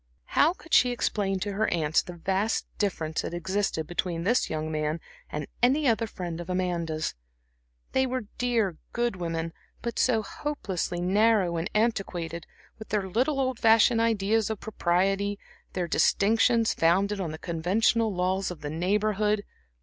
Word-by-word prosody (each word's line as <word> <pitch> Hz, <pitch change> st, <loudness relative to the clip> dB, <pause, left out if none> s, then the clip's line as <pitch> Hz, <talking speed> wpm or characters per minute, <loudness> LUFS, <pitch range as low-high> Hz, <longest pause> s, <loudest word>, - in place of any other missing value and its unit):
How 320 Hz, +4 st, +5 dB
could 335 Hz, -3 st, -13 dB
she 250 Hz, -, +6 dB
explain 205 Hz, -5 st, -1 dB
to 205 Hz, -, -2 dB
her 215 Hz, +2 st, +1 dB
aunts 160 Hz, -2 st, +2 dB
the 180 Hz, -, -9 dB
vast 190 Hz, +5 st, -1 dB
difference 160 Hz, -6 st, -1 dB
that 175 Hz, -, -5 dB
existed 190 Hz, -2 st, -1 dB
between 175 Hz, 0 st, -2 dB
this 235 Hz, +7 st, +2 dB
young 155 Hz, 0 st, -3 dB
man 155 Hz, +1 st, -1 dB, 0.3 s
and 150 Hz, -1 st, -4 dB, 0.2 s
any 275 Hz, +4 st, +3 dB
other 225 Hz, -1 st, +2 dB
friend 175 Hz, -4 st, -5 dB
of 175 Hz, -, -9 dB
Amanda's? 170 Hz, -4 st, -1 dB, 0.8 s
They 265 Hz, 0 st, +2 dB
were 255 Hz, -3 st, -3 dB
dear, 225 Hz, -8 st, +1 dB, 0.2 s
good 240 Hz, -4 st, 0 dB
women, 165 Hz, -1 st, -3 dB, 0.3 s
but 235 Hz, -1 st, -3 dB
so 225 Hz, -4 st, +3 dB
hopelessly 195 Hz, -, -3 dB
narrow 195 Hz, -1 st, +3 dB
and 165 Hz, +5 st, -2 dB
antiquated, 180 Hz, -7 st, -1 dB, 0.3 s
with 220 Hz, -, -9 dB
their 205 Hz, -3 st, 0 dB
little 255 Hz, +9 st, +1 dB
old 260 Hz, -2 st, 0 dB
fashioned 225 Hz, +1 st, +5 dB
ideas 220 Hz, -1 st, +2 dB
of 220 Hz, -2 st, -3 dB
propriety, 195 Hz, 0 st, 0 dB, 0.4 s
their 180 Hz, -2 st, -1 dB
distinctions 225 Hz, +6 st, +3 dB
founded 195 Hz, +5 st, +2 dB
on 165 Hz, -4 st, -3 dB
the 155 Hz, -, -6 dB
conventional 195 Hz, +8 st, +1 dB
laws 185 Hz, +1 st, 0 dB
of 180 Hz, -3 st, -8 dB
the 145 Hz, 0 st, -4 dB
Neighborhood. 210 Hz, +4 st, +1 dB
195 Hz, 155 wpm, -27 LUFS, 175-225 Hz, 0.8 s, she